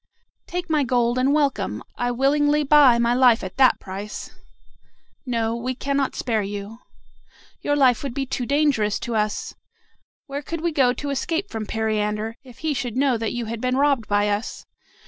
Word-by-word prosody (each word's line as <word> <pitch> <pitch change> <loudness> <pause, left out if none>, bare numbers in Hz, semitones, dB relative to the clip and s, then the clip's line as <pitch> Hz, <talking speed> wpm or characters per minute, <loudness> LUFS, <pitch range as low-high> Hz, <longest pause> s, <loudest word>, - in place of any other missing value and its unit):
"Take 355 0 -4
my 310 -3 +2
gold, 245 -1 +1
and 260 +2 +2
welcome. 280 - 0
I 245 - -1
willingly 290 +4 +2
buy 280 -4 +6
my 235 0 +2
life 245 -2 +4
at 185 - -7
that 265 -1 +5
price." 200 +2 -7 1.0
"No, 230 -2 0
no; - - -2
we 250 +2 -3
cannot 275 +1 -1
spare 225 -3 0
you. 205 +2 -6 0.8
Your 290 - 0
life 255 -5 +4
would 270 -4 -5
be 275 - -1
too 250 -2 -3
dangerous 280 -8 +2
to 235 - -3
us. 210 -1 -1 0.7
Where 280 0 -5
could 330 +3 -5
we 340 0 0
go 270 -5 +3
to 285 +3 -4
escape 330 +8 -2
from 220 -2 -4
Periander, 215 0 -1
if 250 -3 -15
he 310 - +1
should 250 -3 -3
know 270 -2 +3
that 225 -1 -2
you 240 -1 -3
had 225 0 -5
been 255 0 0
robbed 275 -5 +2
by 205 0 +2
us? 205 +2 -3
250 Hz, 185 wpm, -23 LUFS, 225-280 Hz, 1.0 s, buy